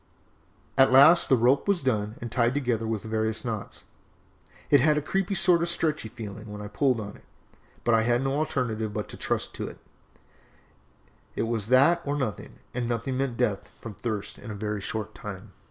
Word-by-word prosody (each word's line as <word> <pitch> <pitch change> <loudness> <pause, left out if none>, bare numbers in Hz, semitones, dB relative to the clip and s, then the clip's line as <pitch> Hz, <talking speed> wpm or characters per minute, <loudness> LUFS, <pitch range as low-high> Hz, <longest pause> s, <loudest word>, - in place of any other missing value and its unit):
At 135 - +7
last 145 +7 +7
the 130 - +5
rope 125 - +3
was 200 -6 +1
done 110 -4 0
and 120 -1 -6
tied 120 +1 +2
together 120 -5 0
with 110 -2 -2
various 110 +1 -1
knots. 110 -4 -5 0.9
It 140 -3 +7
had 150 +1 +4
a - - +3
creepy 195 +4 -1
sort 175 -2 +4
of 170 - +1
stretchy 155 -7 0
feeling 110 -2 -8
when 105 - -7
I 105 0 -7
pulled 125 +3 +1
on 100 -1 -7
it, - - -22 0.6
but 120 - +2
I 115 - +5
had 120 +2 +1
no 135 0 0
alternative 120 -8 -2
but - - -3
to - - -8
trust - - -2
to - - -3
it, - - -9 1.6
it - - 0
was 115 -2 -2
that 140 +8 +5
or 145 0 -2
nothing, 130 -7 -4 0.2
and 120 -1 -2
nothing 120 +2 -2
meant 130 -3 -2
death 105 -4 0
from 115 - -8
thirst 110 0 -5
in - - -10
a 105 - -5
very 105 0 -3
short 110 +1 -4
time. 100 0 -8
120 Hz, 195 wpm, -27 LUFS, 110-135 Hz, 1.6 s, At